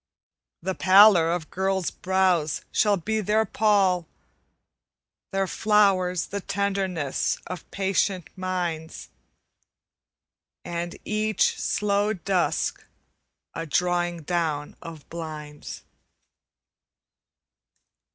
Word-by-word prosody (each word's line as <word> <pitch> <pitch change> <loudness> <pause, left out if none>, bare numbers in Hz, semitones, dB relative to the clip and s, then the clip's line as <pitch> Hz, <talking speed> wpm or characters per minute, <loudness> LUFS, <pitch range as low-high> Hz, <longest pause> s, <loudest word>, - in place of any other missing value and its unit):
The 190 +1 -1
pallor 190 -3 +6
of 170 -2 -3
girls' 190 -1 -1
brows 185 -5 +1
shall 205 -2 +3
be 215 +5 -2
their 215 +2 +2
pall; 195 -5 +2 1.2
Their 195 0 0
flowers 190 -3 +2
the 200 0 -4
tenderness 190 -8 -1
of 180 -2 -8
patient 190 -2 0
minds, 175 -4 -4 1.6
And 170 0 -4
each 215 0 +1
slow 205 +1 +1
dusk 185 -1 -1 0.7
a 165 0 -5
drawing 175 +1 0
down 155 -3 -2
of 160 -3 -10
blinds. 155 -3 -7
185 Hz, 85 wpm, -25 LUFS, 170-200 Hz, 1.6 s, pallor